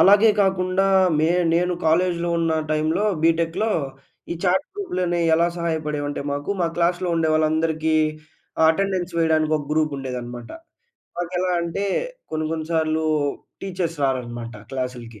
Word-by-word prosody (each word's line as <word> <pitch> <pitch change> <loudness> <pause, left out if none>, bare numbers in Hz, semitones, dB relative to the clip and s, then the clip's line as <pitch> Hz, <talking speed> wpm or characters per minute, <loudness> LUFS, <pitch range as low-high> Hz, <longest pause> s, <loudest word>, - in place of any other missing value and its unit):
అలాగే 205 +3 +7
కాకుండా 190 0 +1 0.3
మే 160 +1 +3 0.3
నేను 180 +1 +2
కాలేజ్‌లో 170 +1 +2
ఉన్న 165 -1 +1 0.2
టైం‌లో, 155 +6 +1 0.2
బీటెక్‌‌‌లో, 165 +6 +2 0.6
ఈ - - -2
చాట్ 185 +1 +2
గ్రూప్‌లనేవి 180 - -1
ఎలా 170 +1 +3
సహాయపడేవి 155 -3 -2
అంటే 145 - -4
మాకు 145 +5 -3
మా 170 - +3
క్లాస్‌‌లో 175 +1 +1
ఉండేవాళ్ళందరికి 160 0 +1 0.7
అటెండెన్స్ 185 0 0
వేయడానికి 155 -1 +2
ఒక 145 - -4
గ్రూప్ 155 -1 +1
ఉండేదన్నమాట. 120 -3 -6 0.7
మాకు 175 0 -3
ఎలా 185 0 0
అంటే, 170 +4 -2 0.5
కొన్ని 155 0 -2
కొన్ని 160 -1 -3
సార్లు 160 0 +1 0.6
టీచర్స్ 180 -4 -3
రారన్నమాట 120 -3 -2 0.2
క్లాసులకి. 125 -4 -5
165 Hz, 125 wpm, -23 LUFS, 155-180 Hz, 0.7 s, అలాగే